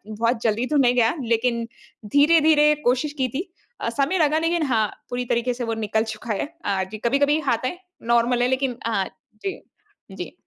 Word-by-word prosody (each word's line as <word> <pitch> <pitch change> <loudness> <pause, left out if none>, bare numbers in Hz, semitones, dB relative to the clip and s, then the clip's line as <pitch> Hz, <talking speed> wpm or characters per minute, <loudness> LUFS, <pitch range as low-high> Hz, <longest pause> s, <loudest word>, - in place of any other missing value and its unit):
बहुत 230 +2 -1
जल्दी 230 +2 +1
तो 300 - -1
नहीं 250 -3 +4
गया 240 +2 +3
लेकिन 235 0 0 0.5
धीरे-धीरे 300 0 +5
कोशिश 255 +4 +1
की 255 - +2
थी। 320 - -5 0.3
अ, 230 - -1
समय 280 +9 0
लगा 310 -1 +3
लेकिन 330 +1 0
हाँ, 220 -4 +2 0.2
पूरी 245 0 -2
तरीके 240 +1 0
से 240 0 -4
वो 230 0 -2
निकल 220 0 0
चुका 220 +1 -5
है। 200 - -2 0.2
अ, 195 -2 0
जी 215 - -5
कभी-कभी 285 +6 +2
आता 235 +2 +1
है 355 - -6 0.3
नॉर्मल 240 +1 +3
है 245 - +3
लेकिन 260 -1 0
अ, 200 -4 +1 0.4
जी, 390 - -3 0.5
जी। - - -7
245 Hz, 190 wpm, -23 LUFS, 230-290 Hz, 0.5 s, धीरे-धीरे